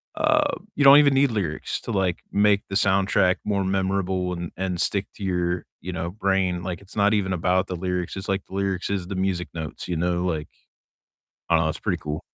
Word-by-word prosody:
uh, 305 -1 +2 0.2
you 145 - +1
don't 140 +1 +10
even 140 -2 +5
need 135 -2 +3
lyrics 90 -8 -2
to - - -6
like 95 -3 +1 0.2
make 100 0 +3
the 95 - -5
soundtrack 95 -1 +3
more 100 -2 0
memorable 95 -1 0
and 85 -1 -5
and 90 -2 -2
stick 100 -1 0
to 100 - -8
your, 90 -1 -1
you 90 +1 -6
know, 85 0 -3
brain. 95 -3 0
Like 90 +1 -4
it's 100 +2 -14
not 100 +1 +4
even 95 -3 +1
about 90 +2 +1
the 90 - -4
lyrics. 90 +1 -3
It's 95 - -6
like 95 0 -1
the 95 - -10
lyrics 95 -1 -1
is 95 -3 -2
the 100 - -5
music 95 -2 -1
notes, 80 0 -6
you 90 - -2
know? 90 +2 0
Like, 80 -4 -2 1.0
I 85 - +4
don't 80 - +2
know, - - +1
it's 80 - -7
pretty 90 -5 -1
cool. 75 +1 -4
95 Hz, 220 wpm, -24 LUFS, 90-100 Hz, 1.0 s, don't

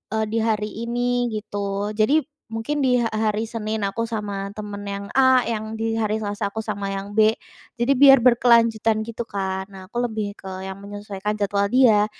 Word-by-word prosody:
eee, 220 - +1
di 230 - 0
hari 215 -2 0 0.2
ini, 245 0 0
gitu. 205 -2 -3
Jadi 225 +9 +2 0.2
mungkin 225 +6 -3
di 250 - +3
ha 225 - 0
hari 215 0 -1
Senin 220 -2 -3
aku 200 +4 -1
sama 205 -3 -4
temen 205 -1 -7
yang 200 0 -4
A, 260 -1 +6
yang 220 -1 -3
di 225 0 -2
hari 220 0 0
Selasa 205 -1 -3
aku 220 - -2
sama 200 -2 -4
yang 195 +1 -5
B, 220 0 +6 0.4
jadi 245 +3 +1
biar 270 -2 +8
berkelanjutan, 230 -3 +4
gitu 230 +1 -5
kan. 190 -2 -3
Nah, 185 -1 -11
aku 240 - -7
lebih 215 -3 -4
ke - - -17 0.2
yang 190 0 -6
menyesuaikan 205 0 -5
jadwal 200 0 +1
dia, 225 -5 +5
215 Hz, 180 wpm, -23 LUFS, 205-230 Hz, 0.4 s, biar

